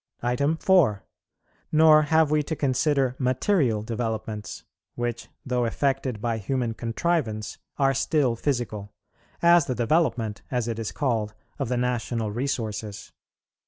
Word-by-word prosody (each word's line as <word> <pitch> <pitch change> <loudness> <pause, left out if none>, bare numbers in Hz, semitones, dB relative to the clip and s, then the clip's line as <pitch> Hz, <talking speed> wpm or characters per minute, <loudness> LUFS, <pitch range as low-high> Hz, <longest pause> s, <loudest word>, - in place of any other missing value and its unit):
4. 160 - +3 0.7
Nor 155 0 +7
have 160 0 +3
we 155 0 +3
to 160 +2 -3
consider 135 -1 +1
material 130 - +1
developments, 110 -2 -4 0.3
which, 120 -1 -3 0.2
though 125 -2 0
effected 135 -1 -1
by 115 0 -1
human 120 +2 -1
contrivance, 115 -2 -2 0.2
are 135 -1 +3
still 135 -2 +1
physical; 115 -6 -3 0.5
as 170 -2 +6
the 125 - -1
development, 120 -5 0
as 125 -3 -1
it 115 -1 -3
is 110 - -3
called, 110 -7 -1 0.2
of - - -2
the 125 - 0
national 120 -3 -1
resources. 110 -4 -4
125 Hz, 125 wpm, -25 LUFS, 110-140 Hz, 0.7 s, Nor